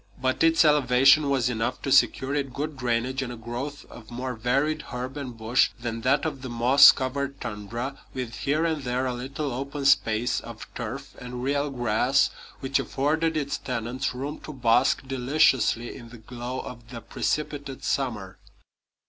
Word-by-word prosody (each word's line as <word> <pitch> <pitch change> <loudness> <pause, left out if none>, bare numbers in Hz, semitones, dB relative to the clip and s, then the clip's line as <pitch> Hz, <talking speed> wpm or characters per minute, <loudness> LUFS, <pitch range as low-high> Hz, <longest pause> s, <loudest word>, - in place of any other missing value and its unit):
But 130 0 0
its 165 0 +5
elevation 140 0 +5
was 130 -3 +2
enough 115 -2 -2
to - - -2
secure 135 +1 +3
it 140 -3 -2
good 150 +1 -3
drainage 125 +1 -1
and 125 -2 -4
a - - -6
growth 120 +6 -6
of 110 -2 -13
more 125 +2 -4
varied 140 +7 0
herb 130 +1 -5
and 130 -5 -6
bush 115 +3 +2
than 115 -1 -4
that 135 +6 +2
of 145 -4 -3
the 130 - -6
moss 120 +4 +7
covered 140 +1 -3
tundra, 115 +4 -5
with 125 -3 -5
here 155 +4 0
and 160 -3 -1
there 125 0 -1
a 125 - -1
little 135 +4 -4
open 140 +2 -4
space 115 -3 +3
of - - -9
turf - - -6
and 125 0 -6
real 140 +2 0
grass 125 +1 +2 0.3
which 135 +1 0
afforded 155 +3 0
its 140 -2 -2
tenants 125 +1 -3
room 140 +4 -5
to - - -9
bask 125 +1 +2
deliciously 130 -3 +2
in 115 - -11
the 120 - -11
glow 120 +3 -6
of 120 -2 -10
the 120 -2 -8
precipitate 145 +2 -3
summer. 110 -9 -2
130 Hz, 170 wpm, -26 LUFS, 120-140 Hz, 0.3 s, moss